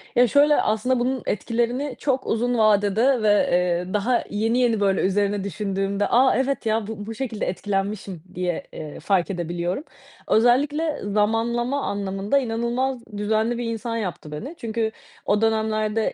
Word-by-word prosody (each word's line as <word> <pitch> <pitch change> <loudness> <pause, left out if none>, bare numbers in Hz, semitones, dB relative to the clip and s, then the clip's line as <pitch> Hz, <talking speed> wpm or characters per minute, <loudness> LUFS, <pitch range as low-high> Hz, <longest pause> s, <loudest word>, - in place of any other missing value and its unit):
Ya, 245 +1 +6
şöyle 290 +4 +4
aslında 230 +4 +1
bunun 255 +1 -1
etkilerini 240 +6 -1
çok 265 -2 -1
uzun 240 +2 0
vadede 215 +4 +3
ve, 205 -1 +3
eee, 180 0 +1
daha 235 +4 +1
yeni 225 +4 0
yeni 235 -3 +2
böyle 195 -2 +2
üzerine 200 +1 +1
düşündüğümde, 195 +1 -1
aaa, 255 +2 +4
evet, 270 -1 -1
ya, 220 -1 0
bu 210 -2 -6
bu 225 +1 -6
şekilde 230 -3 -3
etkilenmişim 195 -1 -3
diye, 180 -2 -2
eee, 150 -2 -7
fark 190 -3 +1
edebiliyorum. 175 - -3 0.4
Özellikle 290 +7 +2
zamanlama 230 +6 0
anlamında 200 +4 -1
inanılmaz 245 +2 -1 0.2
düzenli 220 +3 0
bir 240 - -3
insan 230 0 -3
yaptı 180 -7 -5
beni. 255 - -6
Çünkü 225 -1 -2 0.3
o 205 +1 +2
dönemlerde 220 0 +1
220 Hz, 145 wpm, -23 LUFS, 200-240 Hz, 0.4 s, Ya